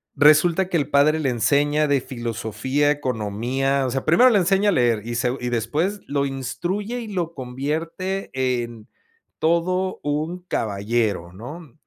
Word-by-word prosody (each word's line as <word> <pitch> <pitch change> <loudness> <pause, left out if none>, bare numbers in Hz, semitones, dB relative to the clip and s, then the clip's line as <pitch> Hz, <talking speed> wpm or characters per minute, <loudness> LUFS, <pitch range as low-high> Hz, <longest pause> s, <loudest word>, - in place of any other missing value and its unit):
resulta 160 +5 +5
que 175 - +1
el 145 - -1
padre 150 +3 +4
le 145 -4 0
enseña 145 +5 +2
de 140 -2 +2
filosofía, 120 +4 -1
economía, 130 +1 -1
o 130 - -2
sea, 135 +1 -2
primero 240 +11 +6
le 215 -5 +4
enseña 195 +3 +3
a - - +4
leer 120 -7 +2
y 120 0 -4
segu 125 +1 0
y 125 - -3
después 145 - -1
lo 140 0 0
instruye 175 - -3
y 230 - -6
lo 175 -5 -3
convierte 160 +9 -3
en 120 -4 -2 0.5
todo 180 +3 +1
un 155 +4 -2
caballero, 105 - -1
¿no? 125 - -10
140 Hz, 150 wpm, -22 LUFS, 120-170 Hz, 0.5 s, primero